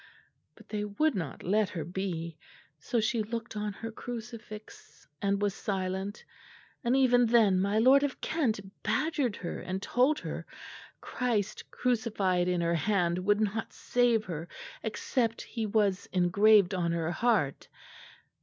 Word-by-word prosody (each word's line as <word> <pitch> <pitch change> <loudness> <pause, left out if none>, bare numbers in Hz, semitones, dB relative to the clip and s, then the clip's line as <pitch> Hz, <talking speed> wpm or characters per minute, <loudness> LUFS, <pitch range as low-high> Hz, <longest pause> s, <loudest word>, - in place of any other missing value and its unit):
But - - -17
they 210 -1 -2
would 265 +10 +1
not 165 - -5
let 205 +2 +2
her 165 -4 -4
be; 170 -1 -4 0.4
so 235 +10 -1
she 220 +1 +1
looked 230 +1 -5
on 210 0 -2
her 225 +3 -6
crucifix 225 -2 -9
and 200 0 +1
was 205 -1 +1
silent; 190 0 -3 0.6
and 240 +1 +2
even 245 -2 +5
then 220 -5 +4
my 200 +2 +1
lord 260 +5 +6
of 285 -2 -2
Kent 260 -11 0 0.2
badgered 270 0 0
her 175 - -5
and 185 +1 -4
told 255 +9 +2
her - - -6 0.5
Christ 230 -5 -2
crucified 210 -7 0
in 180 -1 +1
her 170 0 +1
hand 175 0 +1
would 205 +3 +2
not 215 +1 -2
save 240 -3 +2
her, 165 -1 -5 0.3
except 230 +1 -1
He 225 -2 -4
was 200 -3 +1
engraved 195 +2 +5
on 170 -2 0
her 165 0 -1
heart. 200 - +1
210 Hz, 145 wpm, -30 LUFS, 185-235 Hz, 0.6 s, lord